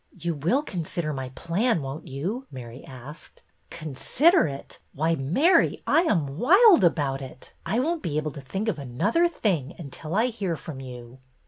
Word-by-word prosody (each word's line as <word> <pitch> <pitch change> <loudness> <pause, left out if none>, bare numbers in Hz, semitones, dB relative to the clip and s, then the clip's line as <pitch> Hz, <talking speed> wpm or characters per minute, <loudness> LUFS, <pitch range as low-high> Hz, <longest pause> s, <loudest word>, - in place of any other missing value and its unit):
You 170 0 -2
will 175 - +1
consider 170 - -3
my 135 -2 -4
plan, 175 - 0
won't 135 +3 -6
you?" 185 - -4
Mary 125 -1 -9
asked. 135 +4 -12 0.3
Consider 160 - +2
it! 140 -1 -8
Why, 160 +4 +1
Mary, 170 - +3
I 325 - +4
am 155 - 0
wild 360 - +7
about 145 -5 +1
it. 130 -1 -10
I 205 +7 0
won't 325 +5 0
be 150 -2 -2
able 155 0 -1
to 140 - -9
think 190 +11 -4
of 185 -9 -1
another 195 - +1
thing 180 - -1
until 155 +1 -6
I 220 +3 +3
hear 205 -8 -2
from 145 -1 -8
you." 125 -1 -10
160 Hz, 165 wpm, -26 LUFS, 135-220 Hz, 0.3 s, wild